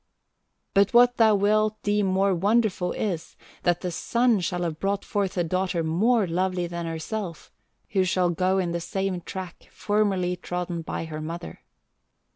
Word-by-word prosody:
"But 200 Hz, +2 st, +3 dB
what 245 Hz, +1 st, +6 dB
thou 220 Hz, -2 st, +5 dB
wilt 215 Hz, +2 st, +2 dB
deem 205 Hz, -1 st, +1 dB
more 190 Hz, +1 st, +2 dB
wonderful 200 Hz, -1 st, +1 dB
is, 180 Hz, -7 st, -3 dB, 0.3 s
that 175 Hz, -1 st, +1 dB
the 180 Hz, -, -3 dB
sun 235 Hz, +5 st, +2 dB
shall 180 Hz, 0 st, -2 dB
have 160 Hz, -2 st, -3 dB
brought 200 Hz, +1 st, -1 dB
forth 200 Hz, -2 st, -1 dB
a 175 Hz, -, +2 dB
daughter 185 Hz, 0 st, -1 dB
more 205 Hz, +8 st, +2 dB
lovely 180 Hz, +1 st, -1 dB
than 170 Hz, -1 st, -4 dB
herself, 165 Hz, +2 st, -5 dB, 0.4 s
who 195 Hz, -2 st, +2 dB
shall 180 Hz, -1 st, +1 dB
go 185 Hz, +3 st, +1 dB
in 180 Hz, -3 st, 0 dB
the 170 Hz, 0 st, -2 dB
same 190 Hz, 0 st, -2 dB
track 185 Hz, 0 st, -8 dB
formerly 195 Hz, -4 st, 0 dB
trodden 175 Hz, -1 st, -4 dB
by 165 Hz, -, -4 dB
her 155 Hz, -1 st, -6 dB
mother. 170 Hz, +2 st, -7 dB
185 Hz, 160 wpm, -25 LUFS, 175-205 Hz, 0.4 s, what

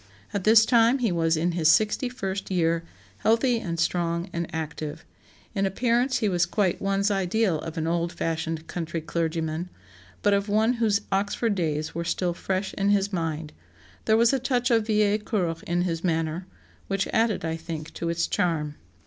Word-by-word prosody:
At 200 Hz, -2 st, -2 dB
this 220 Hz, 0 st, +7 dB
time 235 Hz, +2 st, +4 dB
he 235 Hz, -6 st, 0 dB
was 165 Hz, -1 st, +2 dB
in 170 Hz, +3 st, +1 dB
his 165 Hz, -2 st, +1 dB
sixty 215 Hz, +8 st, +3 dB
first 195 Hz, -6 st, -4 dB
year, 165 Hz, -2 st, +1 dB, 0.4 s
healthy 230 Hz, +2 st, +2 dB
and 170 Hz, -7 st, -4 dB
strong 170 Hz, +1 st, 0 dB
and 170 Hz, -1 st, -2 dB
active.... 155 Hz, 0 st, -5 dB, 0.5 s
In 195 Hz, -2 st, +1 dB
appearance 245 Hz, +5 st, +1 dB
he 225 Hz, -4 st, 0 dB
was 175 Hz, -3 st, +2 dB
quite 190 Hz, -1 st, 0 dB
one's 195 Hz, +1 st, +1 dB
ideal 195 Hz, -2 st, +1 dB
of 165 Hz, +2 st, -7 dB
an 160 Hz, -, -1 dB
old 170 Hz, +1 st, 0 dB
fashioned 165 Hz, -1 st, -3 dB
country 170 Hz, -1 st, -4 dB
clergyman, 165 Hz, +1 st, -2 dB, 0.5 s
but 205 Hz, -, +4 dB
of 200 Hz, +1 st, 0 dB
one 220 Hz, +3 st, +3 dB
whose 205 Hz, -3 st, +3 dB
Oxford 205 Hz, +3 st, +1 dB
days 155 Hz, -4 st, -2 dB
were 170 Hz, -, -3 dB
still 175 Hz, +1 st, -1 dB
fresh 190 Hz, +2 st, -2 dB
in 200 Hz, 0 st, 0 dB
his 200 Hz, 0 st, +2 dB
mind; 160 Hz, -3 st, -3 dB, 0.5 s
there 220 Hz, -, +4 dB
was 235 Hz, +2 st, +4 dB
a 270 Hz, -, +2 dB
touch 245 Hz, -1 st, 0 dB
of 225 Hz, -2 st, +3 dB
vieille 210 Hz, -1 st, +3 dB
cour 185 Hz, -6 st, -1 dB
in 175 Hz, +1 st, +1 dB
his 165 Hz, -2 st, -2 dB
manner, 165 Hz, +1 st, -1 dB, 0.4 s
which 195 Hz, -1 st, 0 dB
added, 225 Hz, -5 st, +1 dB
I 160 Hz, 0 st, -1 dB
think, 160 Hz, -1 st, -7 dB
to 170 Hz, -, -3 dB
its 170 Hz, 0 st, 0 dB
charm. 160 Hz, -6 st, -1 dB
180 Hz, 180 wpm, -26 LUFS, 165-210 Hz, 0.5 s, this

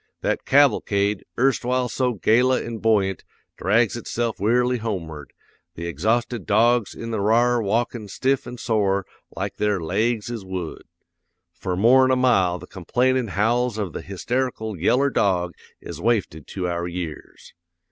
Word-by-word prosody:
That -, -, -1 dB
cavalcade, 105 Hz, -7 st, +2 dB
erstwhile 125 Hz, -1 st, +1 dB
so 125 Hz, +1 st, 0 dB
gala 125 Hz, +5 st, +3 dB
an' 115 Hz, -1 st, -6 dB
buoyant, 100 Hz, -4 st, +1 dB, 0.3 s
drags 110 Hz, +3 st, +2 dB
itself 120 Hz, -1 st, -3 dB
wearily 125 Hz, +4 st, +2 dB
homeward, 85 Hz, -10 st, -5 dB, 0.4 s
the 85 Hz, -, -6 dB
exhausted 110 Hz, -, -1 dB
dogs 115 Hz, +1 st, +3 dB
in 115 Hz, 0 st, -6 dB
the 110 Hz, -, -1 dB
r'ar 120 Hz, +4 st, +3 dB
walkin' 115 Hz, +1 st, -1 dB
stiff 130 Hz, +7 st, -1 dB
an' 125 Hz, -, -7 dB
sore 100 Hz, -5 st, 0 dB, 0.3 s
like -, -, -4 dB
their 105 Hz, -2 st, +1 dB
laigs 110 Hz, +7 st, -1 dB
is 115 Hz, -4 st, -5 dB
wood. 95 Hz, -3 st, -6 dB, 0.7 s
For 90 Hz, +1 st, -4 dB
more'n 130 Hz, +6 st, +5 dB
a 130 Hz, -, +4 dB
mile 95 Hz, -9 st, +3 dB
the 90 Hz, -, -11 dB
complainin' 125 Hz, +7 st, 0 dB
howls 115 Hz, +4 st, 0 dB
of 100 Hz, -7 st, -3 dB
the -, -, -5 dB
hysterical 110 Hz, +2 st, -3 dB
yeller 130 Hz, -, +2 dB
dog 90 Hz, -6 st, +1 dB, 0.3 s
is -, -, -8 dB
wafted 105 Hz, -10 st, -1 dB
to 90 Hz, -2 st, -3 dB
our 85 Hz, 0 st, -2 dB
years. 85 Hz, -3 st, -7 dB
110 Hz, 145 wpm, -23 LUFS, 95-120 Hz, 0.7 s, more'n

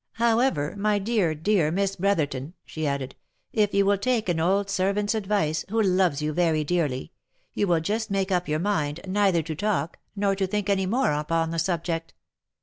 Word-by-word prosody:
" -, -, -59 dB
However, 230 Hz, -, +1 dB
my 210 Hz, 0 st, +2 dB
dear, 200 Hz, -6 st, +1 dB
dear 165 Hz, 0 st, +2 dB
Miss 195 Hz, +3 st, 0 dB
Brotherton," 160 Hz, -5 st, -1 dB
she 155 Hz, -1 st, -4 dB
added, 140 Hz, -2 st, -3 dB, 0.2 s
" -, -, -48 dB
if 205 Hz, -, 0 dB
you 200 Hz, 0 st, +3 dB
will 200 Hz, 0 st, +2 dB
take 230 Hz, -2 st, 0 dB
an 170 Hz, -2 st, +1 dB
old 195 Hz, +4 st, +2 dB
ser 195 Hz, -1 st, +1 dB
vant's 205 Hz, +1 st, 0 dB
advice, 200 Hz, -7 st, 0 dB
who 225 Hz, +3 st, 0 dB
loves 185 Hz, -7 st, +2 dB
you 155 Hz, 0 st, -1 dB
very 160 Hz, -2 st, +2 dB
dearly, 150 Hz, -5 st, -1 dB, 0.4 s
you 205 Hz, -, 0 dB
will 170 Hz, -2 st, +2 dB
just 220 Hz, +6 st, -2 dB
make 195 Hz, 0 st, -1 dB
up 180 Hz, -1 st, +1 dB
your 150 Hz, 0 st, 0 dB
mind, 155 Hz, -4 st, -1 dB
neither 190 Hz, -3 st, +2 dB
to 160 Hz, +1 st, -4 dB
talk, 175 Hz, -3 st, -2 dB, 0.2 s
nor 200 Hz, -1 st, +1 dB
to 195 Hz, -1 st, -1 dB
think 205 Hz, +1 st, -1 dB
any 190 Hz, -1 st, +1 dB
more 250 Hz, -, +2 dB
upon 160 Hz, +2 st, 0 dB
the 165 Hz, -, -1 dB
subject. 165 Hz, -1 st, -2 dB
185 Hz, 200 wpm, -25 LUFS, 160-205 Hz, 0.4 s, you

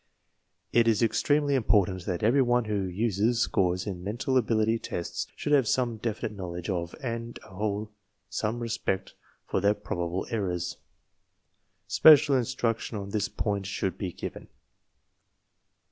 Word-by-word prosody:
It^s 115 Hz, -1 st, +4 dB
extremely 145 Hz, +5 st, +2 dB
importanti 100 Hz, -7 st, +2 dB
that 90 Hz, -1 st, -2 dB
everyone 120 Hz, 0 st, +3 dB
who 105 Hz, -2 st, -1 dB
uses 105 Hz, +4 st, 0 dB
scores 90 Hz, -6 st, +1 dB
in 90 Hz, -4 st, -5 dB
mental 115 Hz, +6 st, -2 dB
ability 115 Hz, -2 st, +2 dB
tests 85 Hz, -, -4 dB
\ -, -, -11 dB
y/ 150 Hz, -, 0 dB
Lave 135 Hz, -5 st, +4 dB
so 130 Hz, +3 st, +2 dB
me 115 Hz, -2 st, -6 dB
defimteTSowledge 100 Hz, -6 st, -4 dB
of 85 Hz, -2 st, -3 dB
and 115 Hz, -1 st, -4 dB
a -, -, -15 dB
whole 105 Hz, +2 st, -3 dB, 0.4 s
some 105 Hz, +4 st, -2 dB
respect 115 Hz, -5 st, -2 dB, 0.3 s
for -, -, -1 dB
their 100 Hz, +2 st, +3 dB
provable 90 Hz, -3 st, -3 dB
errors. 90 Hz, -6 st, -2 dB, 1.1 s
Special 145 Hz, -3 st, +7 dB
instruc 120 Hz, -2 st, 0 dB
tion 110 Hz, -, -5 dB
on 100 Hz, -1 st, -6 dB
this 105 Hz, -2 st, 0 dB
point 100 Hz, -2 st, -2 dB
should 95 Hz, -1 st, -2 dB
be 95 Hz, -3 st, -3 dB
given. -, -, -7 dB
105 Hz, 140 wpm, -28 LUFS, 95-120 Hz, 1.1 s, Special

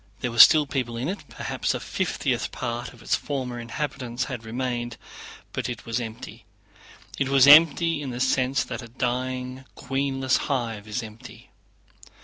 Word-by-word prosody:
There 125 Hz, -, -1 dB
were 115 Hz, -, -4 dB
still 150 Hz, +4 st, +9 dB
people 125 Hz, -4 st, -3 dB
in 125 Hz, +4 st, -2 dB
it, 195 Hz, +1 st, -6 dB
perhaps -, -, -2 dB
a -, -, -3 dB
fiftieth -, -, -2 dB
part 120 Hz, 0 st, -4 dB
of 115 Hz, -2 st, -16 dB
its -, -, -1 dB
former 130 Hz, -4 st, -4 dB
inhabitants 125 Hz, 0 st, -4 dB
had 125 Hz, -5 st, -6 dB
remained, 120 Hz, +1 st, -3 dB, 0.6 s
but -, -, -3 dB
it 120 Hz, -, -6 dB
was 115 Hz, +1 st, -2 dB
empty. 110 Hz, -1 st, -8 dB, 0.8 s
It 135 Hz, -, 0 dB
was 135 Hz, -1 st, +6 dB
empty 160 Hz, +2 st, +6 dB
in 140 Hz, -, -4 dB
the 120 Hz, 0 st, -5 dB
sense 130 Hz, +1 st, +1 dB
that 125 Hz, -1 st, -6 dB
a 120 Hz, -, -9 dB
dying 130 Hz, +1 st, -3 dB
queenless 135 Hz, -1 st, 0 dB
hive 115 Hz, -6 st, -2 dB
is 115 Hz, +3 st, -3 dB
empty. 110 Hz, 0 st, -12 dB
125 Hz, 160 wpm, -25 LUFS, 120-135 Hz, 0.8 s, still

